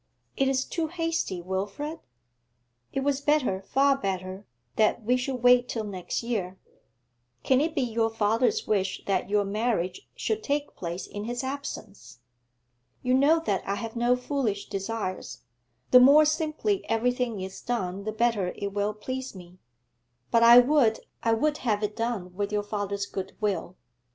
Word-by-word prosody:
'It 270 - +2
is 265 0 +1
too 330 -2 -2
hasty, 330 - -2
Wilfrid. 200 - -4 0.9
It 270 - -1
was 280 0 0
better, 285 -10 +1
far 275 +7 +3
better, 190 -4 -4 0.3
that 220 +1 +2
we 245 +4 +2
should 255 -1 -3
wait 245 0 +5
till 225 - -2
next 190 0 -4
year. 195 -6 -3 0.9
Can 260 0 +3
it 320 +1 -1
be 275 - +1
your 225 -1 0
father's 225 - +1
wish 195 -3 -1
that 190 -1 0
your 205 0 +2
marriage 215 - -2
should 440 0 -2
take 290 -4 -2
place 175 +1 -5
in 205 +1 -7
his 240 +2 -3
absence? 265 - -7 0.9
You 250 0 +1
know 290 +5 +4
that 195 -2 0
I 200 - 0
have 225 +2 -6
no 240 +1 +3
foolish 250 -6 -2
desires; 195 -1 -4 0.5
the 250 - +10
more 285 +5 +7
simply 315 +6 0
everything 240 -1 0
is 190 0 -7
done 200 -5 -3
the 215 - -3
better 215 -4 0
it 200 -1 -4
will 205 +1 -1
please 260 +2 -5
me. 180 0 -13 0.7
But 230 - +4
I 235 +1 +9
would, 245 -4 +3 0.2
I 230 - +2
would 295 +6 0
have 215 -4 0
it 210 0 -2
done 225 -6 -3
with 205 +2 -3
your 210 0 0
father's 200 -1 -3
goodwill. 195 -2 -3
230 Hz, 160 wpm, -27 LUFS, 200-265 Hz, 0.9 s, the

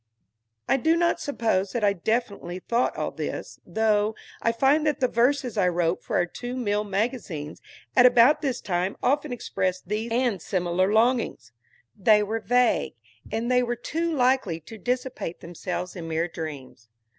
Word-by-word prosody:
I - - +3
do 320 +5 +3
not 340 0 +2
suppose 220 -8 -1
that 235 - -1
I 200 -1 +4
definitely 200 -2 -2
thought 235 +6 0
all - - -2
this, - - -5
though 215 -1 +1 0.3
I 230 - +2
find 270 +6 +3
that 300 - 0
the 255 - +3
verses 245 -1 +1
I 185 - +4
wrote 175 0 0
for - - -3
our 175 - +3
two 245 +7 -6
mill 210 -4 0
magazines 200 - -3 0.3
at 250 -1 +8
about 245 +4 +5
this 265 -4 -2
time 180 +1 -1
often 290 +2 +1
expressed 185 -6 -2
these 220 +2 -2
and 235 -6 +1
similar 185 +2 0
longings. 230 - +1 0.4
They 210 +1 +4
were 220 +2 -2
vague, 245 - +2 0.4
and 225 +3 -1
they 250 0 +4
were 240 -1 -1
too 330 +8 -2
likely 255 - +1
to 220 +8 -11
dissipate 250 -7 -3
themselves 175 +1 -5
in 170 -3 -6
mere 165 +1 0
dreams. 145 -8 -8
220 Hz, 165 wpm, -25 LUFS, 185-250 Hz, 0.4 s, at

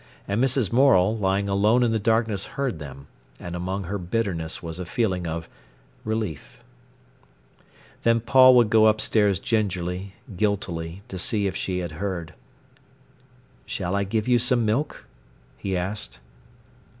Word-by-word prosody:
And 105 +5 0
Mrs. 130 -5 +1
Morel, 115 -6 +4
lying 100 -1 0
alone 105 +5 +3
in 120 - +2
the 110 - +1
darkness 110 -2 +1
heard 135 - -1
them, 70 -2 -9 0.3
and 85 0 -6
among 95 +3 -3
her 100 +3 -4
bitterness 90 -4 -3
was 85 +1 -6
a 90 - -4
feeling 95 -5 -1
of 80 0 -4 0.6
relief. 110 -8 -4 1.4
Then 115 0 +3
Paul 130 +2 +6
would 120 -3 +4
go 110 -1 +6
upstairs 105 -2 +2
gingerly, 95 -3 -2 0.2
guiltily, 90 -3 -2
to 95 -6 -6
see 105 +2 +2
if 95 - -2
she 95 -1 -2
had 85 -2 -5
heard. 85 -5 -4 1.3
"Shall 90 +2 -3
I 100 - +1
give 105 +3 -2
you 125 -1 +4
some 120 0 +3
milk?" 120 +8 -1 0.5
he 95 -2 -3
asked. 95 -5 -4
100 Hz, 140 wpm, -24 LUFS, 90-115 Hz, 1.4 s, Paul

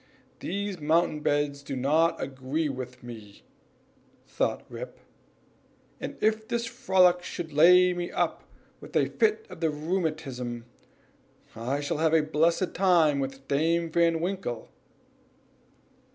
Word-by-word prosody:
"These 200 0 -3
mountain 155 +1 +2
beds 145 -1 0
do 140 - -5
not 155 +6 +2
agree 135 +4 -2
with 125 -2 -7
me," 110 -4 -11 0.8
thought - - -1
Rip, - - -8 1.0
"and - - -6
if 220 0 +1
this 235 0 -1
frolic 185 -6 +3
should 170 -3 -6
lay 180 +4 +6
me 175 0 -4
up - - -1 0.4
with - - -13
a - - +4
fit 440 0 +1
of - - -11
the 165 -1 +1
rheumatism, 150 -7 -3 0.9
I 130 +6 -2
shall 145 +1 -2
have 160 0 +3
a 160 - +4
blessed 165 +4 +1
time 170 -7 +3
with 135 0 -5
Dame 165 +3 +1
Van 165 0 +3
Winkle." 175 - -3
160 Hz, 125 wpm, -27 LUFS, 140-180 Hz, 1.0 s, lay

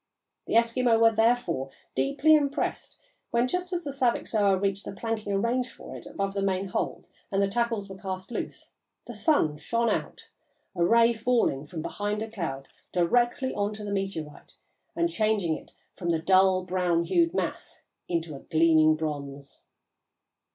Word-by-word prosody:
The - - -1
Eskimo 230 0 +3
were, 225 0 +6
therefore, 225 - +1 0.2
deeply 135 - +3
impressed 285 -2 -1 0.3
when, 235 +1 +2
just 360 +5 -3
as 350 -1 -2
the 285 - -4
Saviksoah 220 -6 +1
reached 195 0 -1
the - - -6
planking 220 0 -3
arranged 240 +5 0
for - - -11
it - - -10
above 195 0 -3
the 200 - -2
main 195 0 -1
hold - - -3 0.2
and 195 - +1
the 200 - +3
tackles 230 -1 -1
were 190 -1 -10
cast 190 +1 -6
loose, - - -6 0.3
the - - -8
sun 155 - +1
shone 235 +5 0
out, - - -4 0.5
a 170 - +1
ray 230 +5 +5
falling 225 - +1
from 160 -2 -6
behind 210 +1 -2
a 225 - -8
cloud 150 -10 -4 0.2
directly 240 +8 +1
on 205 +1 -1
the 210 -1 -6
meteorite 190 -7 -5 0.4
and 340 0 +1
changing 215 - +1
it - - -12 0.2
from 175 - -4
the 165 - +3
dull 185 +2 +4
brown 180 -2 +1
hued 335 - +2
mass - - -4 0.2
into 165 -3 -2
a - - -8
gleaming 155 0 +4
bronze. 140 -3 -6
200 Hz, 160 wpm, -27 LUFS, 170-235 Hz, 0.5 s, were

